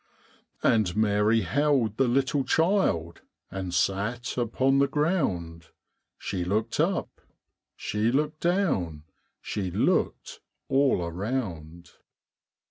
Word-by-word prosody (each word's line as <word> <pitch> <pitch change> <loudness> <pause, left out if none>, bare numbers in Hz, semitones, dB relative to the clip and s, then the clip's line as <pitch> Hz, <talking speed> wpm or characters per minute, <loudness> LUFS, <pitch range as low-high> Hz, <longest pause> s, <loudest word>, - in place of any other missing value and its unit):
And 105 -4 +2
Mary 110 +1 +3
held 130 - +1
the 135 - +3
little 135 +3 +1
child 160 - +1 0.3
And 95 -2 -4
sat 100 +8 -1
upon 130 +3 +1
the 140 - +4
ground; 115 - -1 0.5
She 95 -3 -3
looked 110 +8 -1
up, 175 +4 -1 0.5
she 105 +3 -1
looked 150 +3 0
down, 135 - 0 0.4
She 95 -3 -3
looked - - 0 0.3
all 135 -8 +3
around. 85 -4 -4
115 Hz, 100 wpm, -27 LUFS, 90-140 Hz, 0.5 s, the